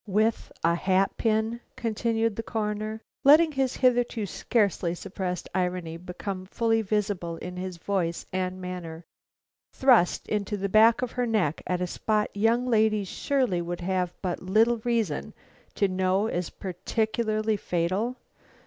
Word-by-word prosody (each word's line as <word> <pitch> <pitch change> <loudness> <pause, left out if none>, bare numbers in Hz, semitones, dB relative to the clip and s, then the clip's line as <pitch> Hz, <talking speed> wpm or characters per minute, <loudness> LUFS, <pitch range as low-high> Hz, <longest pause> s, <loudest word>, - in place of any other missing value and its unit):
"With 215 +3 +1
a 165 +1 +4
hat 190 +2 +1
pin," 220 +1 0 0.2
continued 230 -2 0
the 225 - -2
Coroner, 215 0 -3 0.2
letting 310 +3 +7
his 270 -3 0
hitherto 245 -4 +2
scarcely 200 -5 0
suppressed 185 -1 -4
irony 180 -3 -1
become 185 +2 -6
fully 225 +2 +1
visible 195 -5 -1
in 180 - -7 0.2
voice 170 -1 -2
and 185 0 -2
manner, 175 -3 -6 0.7
"thrust 245 -10 +4
into 210 0 -1
the 200 0 -2
back 225 +4 +5
of 245 - -2
her 250 -1 -1
neck 200 -10 0
at 180 0 -1
a - - +1
spot 210 +4 -1
young 225 +4 +2
ladies 215 -4 +2
surely 255 -11 0
would 175 +1 -4
have 180 -1 0
but 180 -2 -2
little 220 +6 +3
reason 225 -9 -1 0.4
to 200 - +2
know 185 +2 +1
is 180 -6 -2
peculiarly 215 +3 -1
fatal! 185 +7 -1
205 Hz, 140 wpm, -27 LUFS, 180-225 Hz, 0.7 s, letting